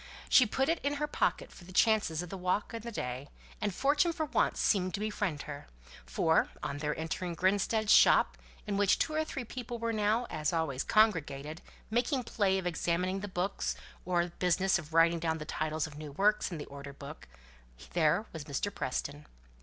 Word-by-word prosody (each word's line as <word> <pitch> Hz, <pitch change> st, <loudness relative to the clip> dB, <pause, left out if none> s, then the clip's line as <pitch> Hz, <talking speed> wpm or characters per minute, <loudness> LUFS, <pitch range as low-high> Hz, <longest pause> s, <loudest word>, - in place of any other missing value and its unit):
She 255 Hz, -, +7 dB
put 265 Hz, +5 st, 0 dB
it 330 Hz, 0 st, +1 dB
into 285 Hz, +1 st, 0 dB
her 300 Hz, -, 0 dB
pocket -, -, -1 dB
for -, -, -14 dB
the 180 Hz, -, -12 dB
chances 185 Hz, -5 st, +2 dB
of 180 Hz, -, -9 dB
the -, -, -4 dB
walk 185 Hz, +5 st, -1 dB
and 230 Hz, -, -4 dB
the 235 Hz, +2 st, -6 dB
day, 130 Hz, -, -5 dB, 0.3 s
and 210 Hz, -, 0 dB
fortune 290 Hz, -, +2 dB
for 320 Hz, -2 st, -2 dB
once -, -, +1 dB
seemed 185 Hz, -3 st, +2 dB
to -, -, -5 dB
befriend 205 Hz, -7 st, -2 dB
her; 145 Hz, -1 st, -8 dB, 0.4 s
for, -, -, +2 dB
on 140 Hz, -, -3 dB
their 150 Hz, 0 st, -2 dB
entering 170 Hz, +2 st, -3 dB
Grinstead's 205 Hz, +4 st, +2 dB
shop, -, -, +6 dB, 0.3 s
in 205 Hz, -2 st, -2 dB
which 200 Hz, -1 st, +4 dB
two 310 Hz, -, 0 dB
or 310 Hz, 0 st, +1 dB
three 270 Hz, -4 st, -5 dB
people 240 Hz, 0 st, -6 dB
were 230 Hz, 0 st, -2 dB
now, 215 Hz, +3 st, +1 dB
as 155 Hz, -1 st, -1 dB
always, 155 Hz, -5 st, -1 dB
congregated, 160 Hz, -8 st, +1 dB, 0.3 s
making 250 Hz, +3 st, +1 dB
play 200 Hz, -4 st, +1 dB
of 190 Hz, -, -3 dB
examining 180 Hz, +2 st, 0 dB
the 205 Hz, -, -5 dB
books, 185 Hz, +1 st, -2 dB, 0.3 s
or 175 Hz, -1 st, +1 dB
business 185 Hz, +1 st, +2 dB
of 155 Hz, -2 st, -10 dB
writing 165 Hz, +1 st, +5 dB
down 160 Hz, -1 st, -1 dB
the 150 Hz, -, -7 dB
titles 155 Hz, 0 st, -2 dB
of 150 Hz, -2 st, -9 dB
new 150 Hz, -2 st, -7 dB
works 205 Hz, +7 st, +2 dB
in 170 Hz, -, -4 dB
the 145 Hz, -, -6 dB
order 140 Hz, 0 st, -9 dB
book, 140 Hz, -, -10 dB, 0.7 s
there 170 Hz, +4 st, +2 dB
was 160 Hz, -3 st, -6 dB
Mr. 155 Hz, +8 st, -2 dB
Preston. 145 Hz, +3 st, -4 dB
185 Hz, 195 wpm, -31 LUFS, 155-215 Hz, 0.7 s, She